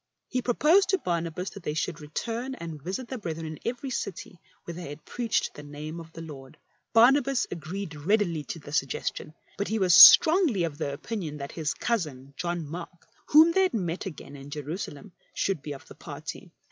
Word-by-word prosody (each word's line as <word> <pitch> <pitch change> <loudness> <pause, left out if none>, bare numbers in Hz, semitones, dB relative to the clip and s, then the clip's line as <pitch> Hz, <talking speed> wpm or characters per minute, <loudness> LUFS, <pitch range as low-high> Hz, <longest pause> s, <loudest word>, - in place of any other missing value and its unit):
He 255 - -1
pro 245 -1 -1
posed 365 +5 +4
to 385 - +3
Barnabas 170 - -3
that 200 - -10
they 150 -3 -3
should 155 0 -2
return 230 - -4
and 165 - -7
visit 190 - -4
the 260 -1 -5
brethren 165 -4 -5
in 155 -1 -7
every 250 +3 -3
city 185 -5 -5 0.2
where 170 - -7
they 170 -3 -7
had 145 +1 -10
preached 235 -2 -1
the - - -10
name 150 +3 -7
of 165 -1 -11
the 165 - -8
Lord. 135 -4 -11 0.3
Barnabas 255 +3 +5
agreed 175 +2 -5
readily 170 0 0
to - - -5
the 145 -2 -11
suggestion, 150 0 -2 0.2
but 200 - -1
he 220 - -1
was 185 -4 +3
strongly 315 - +9
of 160 -2 -3
the 145 - -2
opinion 155 +1 -5
that 140 -1 -6
his 160 -2 -2
cousin 145 - -2
John 175 -1 -3
Mark, 170 +2 -9 0.2
whom 315 +3 +7
they 385 - +3
had 370 -9 +2
met 180 -3 -2
again 145 -4 -9
in 140 0 -10
Jerusalem, 150 +4 -6 0.2
should 190 -7 0
be 145 - -6
of 135 - -12
the - - -11
party. - - -8
170 Hz, 195 wpm, -27 LUFS, 150-230 Hz, 0.3 s, strongly